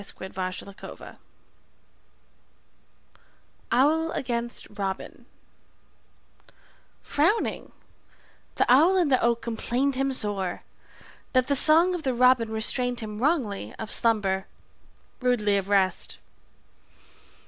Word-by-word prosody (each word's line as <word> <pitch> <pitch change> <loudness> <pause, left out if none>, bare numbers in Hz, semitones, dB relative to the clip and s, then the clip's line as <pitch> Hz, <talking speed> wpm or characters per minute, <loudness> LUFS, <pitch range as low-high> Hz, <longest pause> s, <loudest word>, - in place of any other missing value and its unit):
Sidney 190 -1 -7
Lanier 185 +1 -7 2.5
Owl 310 +6 +2
against 240 -1 -3
Robin 195 -1 -5 1.8
FROWNING, 340 +10 0 0.8
the - - +2
owl 320 +10 +5
in 345 -5 +2
the 260 - +3
oak 235 0 +1
complained 240 +4 -1
him 270 +1 -1
Sore, 205 -7 -1 0.7
that 255 -1 +3
the 280 +2 0
song 325 +6 +5
of 355 - -3
the 260 -4 -1
robin 250 -2 +4
restrained 245 +2 0
him 210 -1 -6
Wrongly 230 - -1
of 220 - -6
slumber, 200 -4 0 0.7
rudely 240 -5 +1
of 195 0 -2
rest. 195 -2 0
240 Hz, 95 wpm, -26 LUFS, 205-270 Hz, 2.5 s, owl